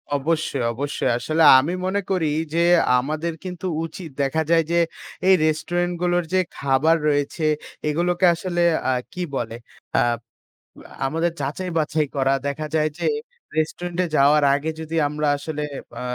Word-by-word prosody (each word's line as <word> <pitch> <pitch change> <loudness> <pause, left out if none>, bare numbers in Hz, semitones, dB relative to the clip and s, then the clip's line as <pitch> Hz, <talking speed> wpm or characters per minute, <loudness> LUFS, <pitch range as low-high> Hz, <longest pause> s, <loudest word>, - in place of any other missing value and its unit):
অবশ্যই, 145 -2 -1
অবশ্যই। 140 +1 -2
আসলে 155 +6 +1 0.2
আমি 150 +7 -1
মনে 190 +2 0
করি 180 -4 +1 0.3
যে 170 +1 +3 0.4
আমাদের 155 +5 -3
কিন্তু 180 0 -5 0.2
উচিত 165 0 -8
দেখা 140 +3 +1
যায় 165 -1 +5
যে 170 - +2 0.5
এই 190 - +7
রেস্টুরেন্ট 175 +3 0
গুলোর 175 0 +2
যে 185 - +4 0.2
খাবার 140 +4 +3
রয়েছে, 145 +2 -1 0.4
এগুলোকে 175 +4 +1
আসলে 175 0 -2 0.3
আ - - +3 0.2
কি 180 - -5
বলে? 115 -3 -3 1.0
আ - - -18 0.2
আমাদের 165 +4 0
যাচাই-বাছাই 155 0 -1
করা 135 -1 +2
দেখা 150 +2 -3
যায় 155 0 +2
যে - - -2 0.5
রেস্টুরেন্ট 170 +2 -2
এ - - -3
যাওয়ার 145 +1 +5
আগে 145 +3 -2
যদি 160 0 -5
আমরা 150 +1 -2
আসলে 150 +1 -4 0.4
আ - - -6
160 Hz, 145 wpm, -22 LUFS, 145-175 Hz, 1.0 s, এই